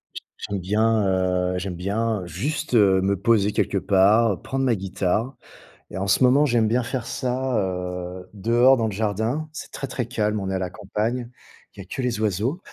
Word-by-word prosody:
J -, -, -6 dB, 0.3 s
j'aime 100 Hz, -1 st, -2 dB
bien, 110 Hz, +3 st, +1 dB
heu 90 Hz, -1 st, 0 dB
j'aime 90 Hz, 0 st, -4 dB
bien 100 Hz, +2 st, -1 dB
juste 130 Hz, -, -3 dB
me 100 Hz, -2 st, +4 dB
poser 105 Hz, -1 st, +3 dB
quelque 100 Hz, -, 0 dB
part, 100 Hz, +2 st, +3 dB
prendre 135 Hz, 0 st, -2 dB
ma 120 Hz, -, +3 dB
guitare 95 Hz, +6 st, -2 dB, 0.6 s
et -, -, -6 dB
en 100 Hz, +1 st, -2 dB
ce 115 Hz, -, +3 dB
moment, 135 Hz, +4 st, +5 dB
j'aime 120 Hz, -4 st, +2 dB
bien 120 Hz, +3 st, +2 dB
faire 120 Hz, +1 st, -4 dB
ça, 130 Hz, 0 st, -1 dB
heu, 90 Hz, -1 st, -4 dB
dehors 120 Hz, +6 st, +4 dB
dans 115 Hz, -3 st, 0 dB
le -, -, -3 dB
jardin. 110 Hz, +9 st, -1 dB
C'est -, -, -8 dB
très, 140 Hz, -, -5 dB
très 125 Hz, -3 st, -4 dB
calme. 105 Hz, -3 st, -1 dB
On 95 Hz, -1 st, -4 dB
est 95 Hz, -, -1 dB
à -, -, +1 dB
la 90 Hz, -1 st, -3 dB
campagne, 110 Hz, +5 st, -3 dB, 0.5 s
il -, -, -15 dB
y -, -, -6 dB
a -, -, -18 dB
que 130 Hz, -, -5 dB
les 120 Hz, -3 st, -1 dB
oiseaux. 110 Hz, -, -1 dB
105 Hz, 200 wpm, -23 LUFS, 95-120 Hz, 0.6 s, moment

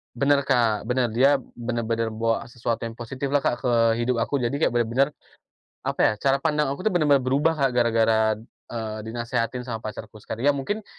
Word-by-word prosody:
Benar, 140 Hz, +2 st, +2 dB
Kak, 115 Hz, -5 st, +2 dB
benar. 125 Hz, -2 st, +1 dB
Dia 135 Hz, +5 st, +4 dB, 0.2 s
benar-benar 115 Hz, -1 st, -1 dB
bawa 115 Hz, +1 st, -1 dB
sesuatu 115 Hz, -1 st, -3 dB
yang 115 Hz, -, -9 dB
positif 130 Hz, +4 st, -5 dB
lah, 140 Hz, 0 st, +1 dB
Kak, 120 Hz, -, 0 dB
ke 125 Hz, -2 st, 0 dB, 0.3 s
hidup 125 Hz, +1 st, +1 dB
aku. 140 Hz, +4 st, -1 dB
Jadi, 125 Hz, +2 st, -1 dB
kayak -, -, +3 dB
benar-benar, 120 Hz, +4 st, +2 dB, 0.8 s
apa -, -, -2 dB
ya, -, -, +5 dB
cara 135 Hz, +4 st, +2 dB
pandang 150 Hz, -2 st, +1 dB
aku 140 Hz, -, -7 dB
tuh -, -, -5 dB
benar-benar 145 Hz, -5 st, +4 dB
berubah 140 Hz, +5 st, +2 dB
Kak 140 Hz, -4 st, +1 dB
gara-gara. 115 Hz, -2 st, +3 dB, 0.5 s
eee, 110 Hz, -2 st, -5 dB
dinasehatin 120 Hz, +2 st, -3 dB
sama 115 Hz, -3 st, -5 dB
pacarku 110 Hz, 0 st, -8 dB
sekar -, -, -6 dB
ya 145 Hz, -, +5 dB
mungkin, 200 Hz, +10 st, -3 dB
120 Hz, 185 wpm, -24 LUFS, 115-140 Hz, 0.8 s, ya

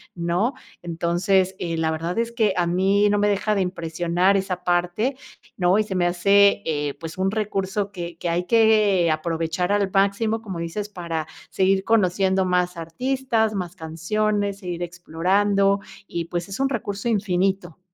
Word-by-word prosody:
¿no? 175 Hz, +8 st, 0 dB, 0.3 s
Entonces, 175 Hz, +3 st, 0 dB
eh, 165 Hz, -2 st, -3 dB
la 160 Hz, 0 st, 0 dB
verdad 165 Hz, +4 st, -3 dB
es 230 Hz, 0 st, -1 dB
que 220 Hz, -4 st, +1 dB
a 175 Hz, -, +2 dB
mí 195 Hz, +4 st, +3 dB
no 205 Hz, -, +2 dB
me 205 Hz, -, +3 dB
deja 205 Hz, +1 st, 0 dB
de 200 Hz, -, +1 dB
impresionar 175 Hz, +1 st, 0 dB
esa 190 Hz, -2 st, -3 dB
parte, 180 Hz, +9 st, 0 dB, 0.4 s
¿no? 180 Hz, +1 st, +3 dB
Y -, -, +3 dB
se 205 Hz, -3 st, -5 dB
me 180 Hz, -1 st, +2 dB
hace, 200 Hz, +3 st, +4 dB
eh, 145 Hz, -2 st, -1 dB
pues, 165 Hz, 0 st, -7 dB
un 190 Hz, +1 st, 0 dB
recurso 200 Hz, -1 st, -2 dB
que 175 Hz, -3 st, -7 dB
que 170 Hz, -, -3 dB
hay 175 Hz, +1 st, 0 dB
que 215 Hz, -6 st, +4 dB
aprovechar 165 Hz, +3 st, -1 dB
al 205 Hz, -1 st, +2 dB
máximo, 200 Hz, +3 st, +1 dB
como 190 Hz, -6 st, -6 dB
dices, 185 Hz, +5 st, -4 dB
para 170 Hz, -5 st, -4 dB, 0.2 s
seguir 190 Hz, 0 st, +2 dB
conociendo 190 Hz, -3 st, +2 dB
más 180 Hz, -1 st, 0 dB
artistas, 225 Hz, +6 st, -1 dB
más 180 Hz, -3 st, -4 dB
canciones, 200 Hz, +5 st, -1 dB
seguir 175 Hz, -3 st, -4 dB
explorando, 195 Hz, +4 st, +1 dB, 0.3 s
y 170 Hz, -1 st, -3 dB
pues, 175 Hz, +2 st, -4 dB
es 195 Hz, -, -6 dB
un 270 Hz, 0 st, +2 dB
recurso 210 Hz, -3 st, -3 dB
infinito. 190 Hz, -4 st, 0 dB
190 Hz, 165 wpm, -23 LUFS, 175-205 Hz, 0.4 s, hace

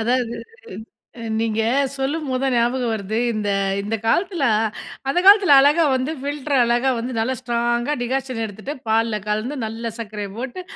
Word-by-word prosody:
அதாவது, 240 Hz, +1 st, 0 dB, 0.8 s
அ -, -, -8 dB, 0.2 s
நீங்க 225 Hz, -1 st, 0 dB, 0.3 s
சொல்லும்போது 270 Hz, -1 st, -2 dB
தான் 265 Hz, -, +1 dB
ஞாபகம் 240 Hz, 0 st, +1 dB
வருது, 215 Hz, 0 st, -3 dB
இந்த 210 Hz, -2 st, -2 dB, 0.3 s
இந்த 215 Hz, +3 st, -2 dB
காலத்தில 345 Hz, -, +1 dB, 0.6 s
அந்த 275 Hz, -, +1 dB
காலத்தில 400 Hz, -5 st, +7 dB
அழகா 295 Hz, +4 st, +4 dB
வந்து 260 Hz, +4 st, -1 dB
ஃபில்டர் 285 Hz, 0 st, -2 dB
அழகா 240 Hz, +3 st, +2 dB
வந்து 245 Hz, +2 st, -4 dB
நல்லா 230 Hz, +4 st, 0 dB
ஸ்ட்ராங்கா, 240 Hz, +2 st, 0 dB
டிக்காஷன் 255 Hz, -1 st, -2 dB
எடுத்துட்டு, 215 Hz, +7 st, -6 dB
பால்ல 225 Hz, 0 st, +1 dB
கலந்து, 215 Hz, +7 st, -2 dB
நல்ல 225 Hz, +1 st, -5 dB
சர்க்கரை 210 Hz, -2 st, -5 dB
போட்டு. 265 Hz, +8 st, -5 dB
240 Hz, 145 wpm, -21 LUFS, 225-270 Hz, 0.8 s, காலத்தில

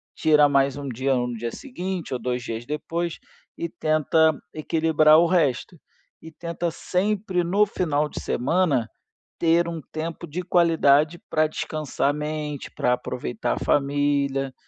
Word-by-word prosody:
tira 150 Hz, -2 st, +5 dB
mais 140 Hz, 0 st, +2 dB
um 140 Hz, -1 st, -6 dB
dia 130 Hz, +2 st, 0 dB
no 125 Hz, -1 st, -1 dB
dia 115 Hz, +1 st, -4 dB
seguinte 190 Hz, -, -5 dB
ou 125 Hz, -, -2 dB
2 125 Hz, -1 st, -2 dB
dias 115 Hz, +1 st, -5 dB
depois 165 Hz, +3 st, -3 dB, 0.4 s
e 170 Hz, -, -2 dB
tenta 155 Hz, 0 st, +2 dB, 0.2 s
equilibrar 155 Hz, 0 st, +4 dB
o 170 Hz, -, +5 dB
resto, 165 Hz, -2 st, +1 dB, 0.4 s
e 160 Hz, -, -11 dB
tenta 170 Hz, +1 st, -4 dB
sempre 185 Hz, +1 st, -1 dB
no 200 Hz, +5 st, +3 dB
final 155 Hz, -7 st, 0 dB
de -, -, -6 dB
semana, 135 Hz, -3 st, +1 dB, 0.5 s
ter 170 Hz, +1 st, +3 dB
um 165 Hz, -1 st, -4 dB
tempo 165 Hz, +2 st, -5 dB
de 170 Hz, +4 st, -4 dB
qualidade 165 Hz, -3 st, +3 dB
para 155 Hz, 0 st, +3 dB
descansar 150 Hz, -2 st, -2 dB
a -, -, +1 dB
mente, 150 Hz, -1 st, -4 dB
para 125 Hz, -, +1 dB
aproveitar -, -, -3 dB
a -, -, -3 dB
família, 140 Hz, -1 st, +1 dB
155 Hz, 145 wpm, -24 LUFS, 140-170 Hz, 0.5 s, tira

